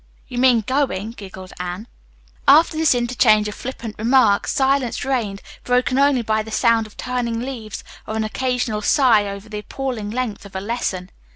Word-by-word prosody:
'" - - -33
"You 245 -2 -4
mean 250 -3 +5
going," 225 -4 -1
giggled 190 -4 -10
Anne. 180 +5 -5 0.6
After 315 +4 +6
this 315 -4 +3
interchange 235 -3 +3
of 210 - -4
flippant 235 -3 -7
remarks 225 -3 +3
silence 265 -3 +1
reigned, 225 -7 -2 0.2
broken 250 +1 +1
only 280 -3 +3
by 220 0 +1
the 220 - -8
sound 225 0 +2
of 210 - -20
turning 245 -2 -2
leaves 235 -4 -6 0.2
or 220 - -4
an 220 - 0
occasional 245 -1 -1
sigh 225 -4 +4
over 200 +1 -7
the 210 -1 -5
appalling 240 -2 -4
length 230 -3 -3
of 200 -2 -13
a - - -1
lesson. 190 -3 -3
230 Hz, 175 wpm, -21 LUFS, 210-255 Hz, 0.6 s, After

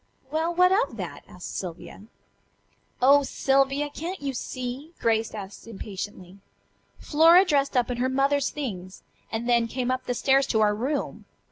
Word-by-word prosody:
"Well, 320 +2 0
what 360 +1 +4
of 425 +6 +1
that?" - - -6
asked 180 - -9
Sylvia. 180 +2 -7 1.0
"Oh, 280 +2 +7
Sylvia! 275 +1 +1
Can't 345 +6 -5
you 280 -1 -3
see?" 255 +5 -6
Grace 225 -1 0
asked 200 +1 -9
impatiently. 195 -3 -8 0.6
"Flora 330 +5 +5
dressed 280 -5 +1
up 245 0 +1
in 245 - -3
her 255 +2 0
mother's 275 +1 +1
things, 190 -10 -6 0.3
and 230 +1 -3
then 235 -1 +3
came 250 +2 -2
up 255 0 -3
the 245 - -1
stairs 270 +2 +3
to 220 -4 +1
our 210 -1 +4
room. 265 +7 -3
260 Hz, 155 wpm, -26 LUFS, 225-285 Hz, 1.0 s, Oh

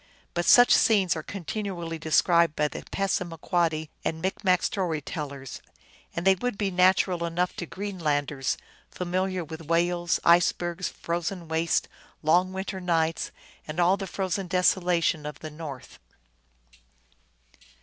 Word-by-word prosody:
But 175 0 -1
such 245 +4 +7
scenes 200 -6 +4
are 160 - -3
continually 175 -2 -5
described 165 +1 +3
by 150 - +2
the - - -7
Passama 180 -4 -1
quoddy 160 -3 0
and 160 - -2
Micmac 185 0 +1
story 175 -6 -1
tellers, 140 -2 -6 0.5
and 170 - -3
they 195 - +7
would 225 +3 -3
be 200 -2 -1
natural 180 -1 +3
enough 170 +2 -1
to 175 - -4
Greenlanders, 150 -9 -2 0.3
familiar 185 0 -2
with 160 0 -9
whales, 175 +1 +1
icebergs, 175 +1 +3
frozen 170 +1 -4
wastes, 160 +1 +1 0.4
long 180 +4 +3
winter 190 0 -4
nights, 165 -2 0 0.4
and 155 +2 -5
all 175 +2 +4
the 195 -1 -5
frozen 190 0 -2
desolation 175 -3 +2
of 150 -1 -7
the 155 0 -8
north. 150 -4 -9
175 Hz, 130 wpm, -27 LUFS, 160-185 Hz, 0.5 s, such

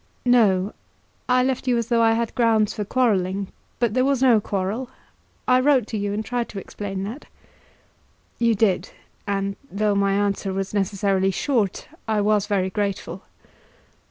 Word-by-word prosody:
"No; 210 -6 +3 0.6
I 250 0 +4
left 260 0 -1
you 245 -1 +3
as 235 0 -2
though 235 -1 +3
I 225 0 +4
had 230 0 -1
grounds 225 -3 +2
for 210 - -3
quarrelling; 200 -5 0 0.3
but 235 -3 0
there 255 +1 +2
was 275 -1 +2
no 235 -5 +5
quarrel. 205 +6 -3 0.6
I 255 0 +5
wrote 260 -3 +3
to 220 - -3
you, 200 0 -2
and 215 +2 -3
tried 245 0 -2
to 200 - -6
explain 195 -1 -6
that." 230 +9 -7 1.1
"You 230 -1 +3
did; 205 -3 +1 0.4
and 195 0 -2
though 210 +1 +1
my 200 0 +2
answer 200 -1 0
was 195 +1 -3
necessarily 195 -1 +1
short, 215 -1 -1 0.2
I 215 -1 +1
was 210 0 +2
very 190 -3 0
grateful." 200 -1 -3
210 Hz, 160 wpm, -23 LUFS, 195-235 Hz, 1.1 s, no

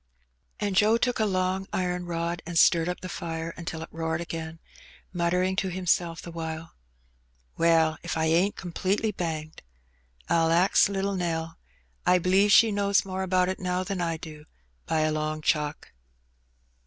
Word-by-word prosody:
And 205 -2 -1
Joe 215 +3 +5
took 245 0 0
a 220 - +3
long 185 0 -1
iron 180 -1 -2
rod 170 0 -2
and 170 -1 -3
stirred 165 +1 +5
up 180 - -4
the 185 - -5
fire 165 -2 -4
until 160 -1 -6
it - - -10
roared 160 0 -2
again, 165 -1 -6 0.6
muttering 180 +2 +1
to 190 - 0
himself 175 -2 0
the 170 - -8
while. 165 0 -6 0.8
''Well, 165 -2 +3
if - - -4
I 160 - +1
ain't 170 +5 +2
completely 190 +5 -1
banged. 160 -4 -5 0.7
I'll 165 -1 +3
ax 180 +4 +4
little 200 0 -1
NelL 165 -2 -2 0.5
I 180 0 +4
b'lieve 190 +3 +3
she 225 +2 +7
knows 200 -1 +2
more 190 0 -4
about 185 -1 +2
it 185 - -3
now 180 0 -1
than 190 -1 -3
I 165 -1 -1
do, 155 -2 -10 0.4
by 160 - +1
a 155 0 +1
long 155 0 -2
chalk." 150 -2 -1
175 Hz, 165 wpm, -27 LUFS, 165-185 Hz, 0.8 s, she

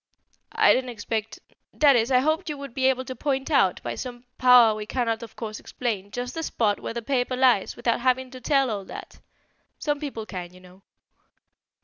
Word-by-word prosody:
"I - - +5
didn't 255 0 -1
expect 220 -1 -4 0.4
that 285 -3 +5
is, 230 0 +2
I 255 -1 +4
hoped 315 +5 0
you 295 - -4
would 280 -3 -8
be 260 +1 +2
able 260 -1 +1
to 260 - -6
point 270 +2 -2
out, 195 -11 +3
by - - -3
some 245 -1 -7
power 250 -3 +7
we 210 0 -6
cannot 230 -2 -1
of 230 -2 -10
course 215 -2 -6
explain, 210 -6 -4
just 245 +3 -5
the 325 - -4
spot 215 -9 0
where - - -6
the 235 - -4
paper 255 0 0
lies, 250 -6 +3
without 240 -1 0
having 255 0 +1
to 255 -1 -10
tell 275 -1 +2
all 200 -2 -3
that. - - -10 0.6
Some 295 -1 -1
people 270 -7 -5
can, 180 -3 -7
you - - -14
know." 185 +1 -18
245 Hz, 205 wpm, -25 LUFS, 220-265 Hz, 0.6 s, power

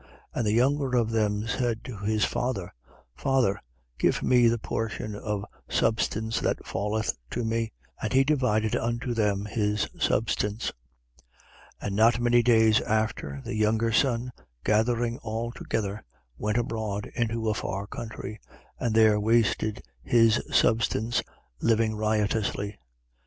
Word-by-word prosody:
15:12. - - -24 0.3
And 115 - -1
the 105 - +2
younger 130 +2 +2
of 115 -2 +1
them 105 -1 0
said 115 -1 -1
to 125 - -7
his 105 +1 +1
father: 120 -7 -2 0.4
Father, 130 -8 +1 0.4
give - - +2
me 125 -2 +5
the 115 +1 +2
portion 110 -1 -3
of 105 -1 -3 0.2
substance 110 0 0
that - - -1
falleth 110 +2 -1
to 120 -1 -2
me. 115 0 -1 0.3
And 110 - -2
he 135 +1 +5
divided 125 -7 +1
unto 120 +2 -1
them 105 -3 0
his 105 -1 0
substance. 105 0 0 1.1
15:13. - - -2
And 100 - -2
not 115 +3 +4
many 120 0 +4
days 110 -2 +5
after, 105 -11 -1
the - - -4
younger 110 +2 +2
son, 125 0 +1 0.3
gathering 115 +2 +1
all 115 +1 -3
together, 105 -3 -3 0.3
went 105 - -1
abroad 110 -3 -2
into 115 -1 -1
a 110 - +2
far 100 -1 -3
country: 110 -2 -7 0.4
and 115 -3 0
there 110 -2 +5
wasted 110 -1 +1 0.2
his 115 - +4
substance, 115 +1 +2 0.4
living 115 -1 +2
riotously. 105 -1 0
110 Hz, 135 wpm, -27 LUFS, 105-120 Hz, 1.1 s, me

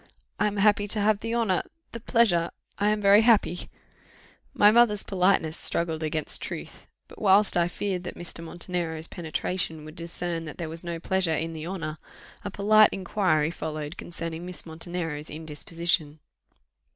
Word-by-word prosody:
I 210 - +3
am 205 0 -3
happy 205 0 +3
to 210 +1 0
have 210 0 +3
the 230 +2 -3
honour 220 -6 +2 0.3
the 230 - -6
pleasure 205 -8 +3 0.3
I 205 +1 +3
am 210 0 +1
very 200 +1 +7
happy 215 -6 +3 0.4
" - - -28
My 210 - +10
mother's 220 -3 +4
politeness 180 -4 +2
struggled 165 -2 -1
against 155 0 -3
truth; - - -7 0.2
but - - -14
whilst 205 0 +5
I 170 -1 +3
feared 185 0 -3
that - - -5
Mr. 170 -1 -4
Montenero's 165 -1 -4
penetration 160 -1 -3
would 155 +1 -10
discern 170 0 -3
that 150 - -8
there 165 -3 -4
was 165 +2 -6
no 170 -1 -4
pleasure 185 -2 +1
in 165 +2 -3
the 160 0 -6
honour, 165 -4 -4 0.4
a - - -3
polite 215 +2 +5
inquiry 185 -5 +1
followed 155 -1 -5
concerning 165 -2 -5
Miss 180 0 -7
Montenero's 160 -2 -4
indisposition. 160 0 -2
175 Hz, 165 wpm, -26 LUFS, 160-200 Hz, 0.4 s, My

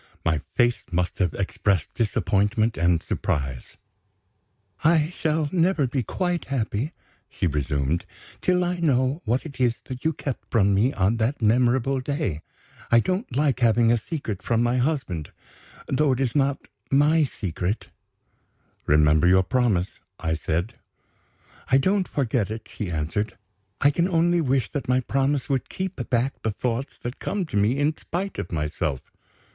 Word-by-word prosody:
My 80 -3 +1
face 120 0 +3
must 90 0 -1
have 90 -5 +1
expressed 95 -3 0
disappointment 110 0 +1
and 85 0 +2
surprise. 65 -4 -3 1.1
"I 160 +1 +3
shall 155 -1 0
never 175 -4 +2
be 130 +1 -1
quite 175 - -2
happy," 130 +2 -2 0.4
she - - -3
resumed, 75 0 0 0.4
"till 180 0 +2
I 180 0 -1
know 135 -1 +1
what 120 +6 0
it 140 -4 -9
is 120 -2 +3
that 130 -1 -8
you 160 - +2
kept 140 -4 -5
from 100 -3 +3
me 110 +7 +3
on 100 -1 +1
that 115 +6 0
memorable 125 +4 +2
day. 130 - -2 0.5
I 120 - +7
don't 185 - -2
like 140 -2 +2
having 115 -1 +4
a 120 - +4
secret 110 - -5
from 115 0 +1
my 120 +1 +1
husband 125 - -1 0.6
though 140 0 +2
it 125 - -3
is 130 -2 0
not 140 -1 +2 0.3
my 150 +4 +4
secret." 95 - -3 1.0
"Remember 75 +2 +4
your 95 +1 +5
promise," 105 -4 0 0.2
I 80 -2 -1
said 85 +7 -2 0.9
"I 130 - +6
don't 190 +7 +2
forget 120 -7 0
it," 110 +1 -6
she 105 - -5
answered. 85 +7 -2 0.4
"I 145 - +5
can 170 +4 +1
only 175 -1 +2
wish 130 -5 0
that 140 -3 -4
my 130 0 +3
promise 135 +2 0
would 135 -3 -1
keep 185 -9 -4
back 125 +3 0
the 110 - 0
thoughts 120 +4 -3
that 120 +2 -5
come 200 -3 -2
to 155 - -7
me 105 +6 +2
in 145 +2 +1
spite 185 +6 -4
of - - -5
myself." 75 -4 -2
125 Hz, 155 wpm, -24 LUFS, 100-145 Hz, 1.1 s, I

